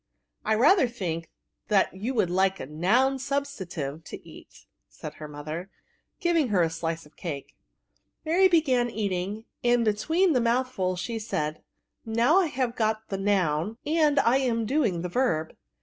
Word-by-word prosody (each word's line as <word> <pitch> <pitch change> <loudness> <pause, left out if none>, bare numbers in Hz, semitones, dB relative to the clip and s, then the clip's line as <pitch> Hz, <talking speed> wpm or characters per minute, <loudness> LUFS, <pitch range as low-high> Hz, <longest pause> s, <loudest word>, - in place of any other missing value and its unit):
*^ - - -57 0.4
I 220 - +2
rather 280 - +5
thiok 175 -9 -4 0.7
you 220 +8 -4
wonld 190 -6 +2
like 190 +2 +1
a - - -5
noun 205 - +2
sttbstantiye 190 - -4
to - - -10
eat/* - - -15 0.2
said - - -9
her 150 - -5
mother, 155 +5 -6 0.5
giving 335 -5 +2
her 195 -6 +2
a 165 - +1
sliee 165 0 -4
of 150 - -20
cake. 145 -6 -6 0.7
Mary 355 +5 +5
began 270 -9 +2
eating, 205 0 -3 0.2
and, 240 -1 +3
between 320 - +2
the 255 - +3
mouthfols, 235 -6 0
she 225 +6 -3
said, 155 -8 -3 0.3
« - - -55
Now 235 +10 +3
I 370 - +2
have 255 -4 -2
got 220 -1 -1
the 195 - -3
noun, 195 0 0
and 300 -2 +3
I 240 +3 +3
am 235 -4 0
doing 220 - 0
the 180 - -3
verb. 170 -8 0
220 Hz, 165 wpm, -26 LUFS, 175-260 Hz, 0.7 s, rather